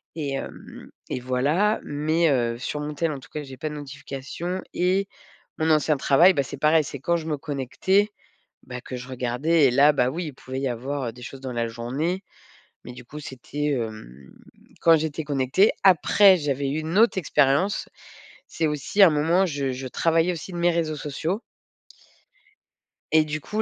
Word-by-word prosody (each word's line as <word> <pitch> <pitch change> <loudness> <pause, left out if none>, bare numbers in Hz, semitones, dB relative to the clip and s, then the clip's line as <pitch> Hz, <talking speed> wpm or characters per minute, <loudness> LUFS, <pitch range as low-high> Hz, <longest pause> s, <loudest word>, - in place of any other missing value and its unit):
et 145 -4 -3
hem - - -9 0.2
et - - -2
voilà. 145 - +1
Mais, 155 +3 +1
heu, 120 -2 0
sur 150 +3 -4
mon 150 0 -4
tel 165 +1 0
en 140 - -5
tout - - -16
cas, 150 - -3
j'ai 135 -2 -10
pas 155 - -4
de 150 - -7
notifications 145 +5 -6
et 190 +3 +1 0.5
mon 160 - +1
ancien 155 -1 +3
travail, 160 +8 +5
bah, 140 -4 +1
c'est - - -8
pareil, 155 +1 +4
c'est 140 0 -7
quand 170 +6 0
je 160 - -7
me 150 -2 -1
connectais, 150 - 0 0.6
bah, 125 0 -7
que 130 - -7
je 125 +1 -8
regardais 130 +6 +2
et 130 - +4
là, 145 +4 +6
bah 125 -3 +2
oui, 170 +3 -4
il - - -8
pouvait 130 +1 -7
y 135 - -1
avoir, 130 +2 -3
heu, 115 - -5
des 125 - -15
choses 135 +2 -9
dans 130 - -5
la 115 -1 -1
journée. 135 +11 -3 0.6
Mais 125 - -8
du 125 - -11
coup, 150 +5 -9
c'était, 145 +2 -4
hem, 110 - -5 0.5
quand 165 -1 +6
j'étais 155 0 -3
connectée. 140 +7 +2
Après, 190 +1 +6
j'avais 140 -2 -1
eu 150 +3 -1
une 160 +4 -2
autre 230 -3 +4
expérience. 160 +2 +1 0.6
C'est 160 - -1
aussi 150 +7 -1
un 185 - +8
moment 165 +6 +2
je 140 -4 -2
je 130 +1 -6
travaillais 165 +5 +1
aussi 175 +3 -8
de 175 - -5
mes 175 0 +3
réseaux 160 -2 -1
sociaux 160 +8 -3 1.7
et 155 -1 +5
du 155 0 -4
coup, 215 +8 -2
150 Hz, 190 wpm, -24 LUFS, 130-165 Hz, 1.7 s, un